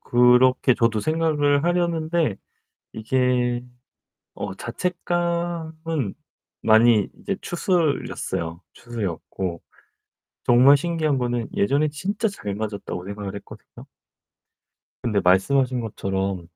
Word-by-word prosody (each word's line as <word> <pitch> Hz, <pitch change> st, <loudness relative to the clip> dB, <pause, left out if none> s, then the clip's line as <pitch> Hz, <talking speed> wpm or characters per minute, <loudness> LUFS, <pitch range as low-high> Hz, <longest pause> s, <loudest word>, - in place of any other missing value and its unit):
그렇게 125 Hz, +1 st, +4 dB
저도 115 Hz, -2 st, +1 dB
생각을 155 Hz, -1 st, +1 dB
하려는데 170 Hz, -, 0 dB, 0.6 s
이게 125 Hz, +1 st, 0 dB, 0.7 s
어 100 Hz, -2 st, -5 dB
자책감은 170 Hz, -, -2 dB, 0.5 s
많이 110 Hz, -1 st, +5 dB
이제 195 Hz, -, -3 dB
추스렸어요. 155 Hz, -, -1 dB
추스렸고 95 Hz, -5 st, -5 dB, 0.8 s
정말 130 Hz, +4 st, +7 dB
신기한 155 Hz, -2 st, 0 dB
거는 120 Hz, -2 st, -2 dB
예전에 140 Hz, +9 st, +2 dB
진짜 200 Hz, +9 st, -2 dB
잘 105 Hz, -, -5 dB
맞았다고 100 Hz, -4 st, -5 dB
생각을 100 Hz, -1 st, -6 dB
했거든요. 100 Hz, -, -12 dB, 1.2 s
근데 105 Hz, -4 st, +1 dB
말씀하신 125 Hz, +8 st, +3 dB
것처럼 95 Hz, -5 st, -3 dB
125 Hz, 235 characters per minute, -23 LUFS, 105-160 Hz, 1.2 s, 정말